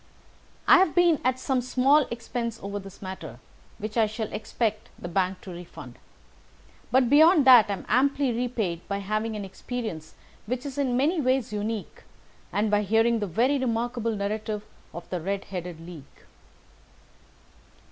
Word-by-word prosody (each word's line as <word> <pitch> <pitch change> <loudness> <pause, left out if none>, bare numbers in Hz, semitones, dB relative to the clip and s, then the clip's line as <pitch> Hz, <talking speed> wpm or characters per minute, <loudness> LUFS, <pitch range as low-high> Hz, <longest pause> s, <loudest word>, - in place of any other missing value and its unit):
"I - - +8
have 370 -4 +2
been 345 -3 +4
at 255 0 +1
some 260 -1 0
small 265 +4 +3
expense 235 -1 -4
over 200 +1 -4
this 195 0 -12
matter, 165 -9 -7 0.4
which 215 +2 -5
I 220 -2 +4
shall 220 0 -5
expect 215 -1 -2
the - - -7
bank 185 +1 -1
to 190 - -9
refund, 175 0 -10 0.9
but 255 -1 +3
beyond 310 +3 +6
that 250 -4 +8
I - - +1
am 195 - -7
amply 275 +2 +2
repaid 225 -8 -2
by 200 - -2
having 215 +3 -2
had 210 - -4
an - - -5
experience 195 -6 -6 0.3
which 250 +4 -3
is 285 0 -5
in 255 -3 +1
many 310 +5 +2
ways 255 -3 0
unique, 210 0 -4 0.5
and 210 +1 0
by 210 0 +3
hearing 225 +3 +2
the 205 - -2
very 250 - +1
remarkable 235 -2 -1
narrative 210 +1 -3 0.3
of 170 - -9
the 180 -2 -2
Red 195 +3 -3
headed 175 -2 -5
League." 165 -4 -12
225 Hz, 160 wpm, -26 LUFS, 200-255 Hz, 0.9 s, I